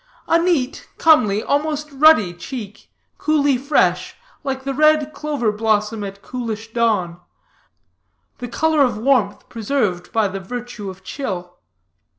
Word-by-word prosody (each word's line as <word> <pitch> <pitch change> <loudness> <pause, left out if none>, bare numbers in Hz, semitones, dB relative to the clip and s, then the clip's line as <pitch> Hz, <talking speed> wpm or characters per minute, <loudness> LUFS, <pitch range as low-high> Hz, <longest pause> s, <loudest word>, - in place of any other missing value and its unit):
A 335 - +4
neat, 330 -7 0
comely, 215 -11 +4
almost 300 +1 -1
ruddy 275 - +5
cheek, 210 +3 -8 0.3
coolly 290 -3 +2
fresh, 280 +4 +1 0.3
like 265 -1 -3
a 275 - -1
red 305 +1 +3
clover 290 -8 -1
blossom 215 0 0
at 200 0 -8
coolish 225 -3 -5
dawn 205 -7 0 1.2
the 245 - -5
color 315 +5 +1
of 250 -6 +2
warmth 225 -4 +1
preserved 215 -6 -2
by 220 -2 +2
the 195 0 -5
virtue 235 +1 -6
of 190 0 -11
chill. 185 -6 -5
245 Hz, 130 wpm, -20 LUFS, 205-285 Hz, 1.2 s, ruddy